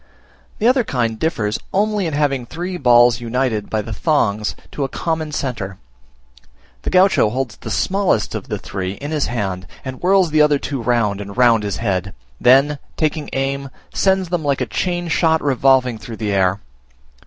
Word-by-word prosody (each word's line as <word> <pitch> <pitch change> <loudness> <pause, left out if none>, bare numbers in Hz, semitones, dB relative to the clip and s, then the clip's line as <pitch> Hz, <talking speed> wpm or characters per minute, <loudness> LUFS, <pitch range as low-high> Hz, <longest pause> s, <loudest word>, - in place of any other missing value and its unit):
The 220 - +1
other 255 0 +4
kind 115 - -1
differs 110 -10 -1
only 205 -1 +1
in 160 - -4
having 140 -4 0
three 180 +6 -5
balls 120 -4 +5
united 120 -3 -1
by 110 -1 -1
the 110 - -6
thongs 105 - 0 0.2
to 145 - -3
a 135 - -2
common 160 -1 -2
centre. 115 -10 -4 1.0
The - - -3
Gaucho 185 - +4
holds 125 -1 -3
the - - -8
smallest 190 - 0
of - - -5
the 105 -4 -3
three 95 -1 -4
in 145 +8 -7
his 150 -2 0
hand, 95 -7 -3 0.2
and 130 0 -5
whirls 185 -2 +3
the 155 0 +4
other 150 -1 +4
two 140 -2 -4
round 115 -4 +1
and 100 +2 -8
round 120 -3 +5
his 100 -2 -3
head; 95 -4 -2 0.2
then, 135 +3 +4 0.2
taking 155 -1 -1
aim, 135 +1 -2 0.2
sends 190 -2 +1
them 175 -2 -1
like 140 -2 0
chain 175 -1 -1
shot 160 0 +2
revolving 130 -4 +2
through 115 0 -8
the 105 -2 -2
air. 95 0 +1
130 Hz, 175 wpm, -19 LUFS, 110-160 Hz, 1.0 s, balls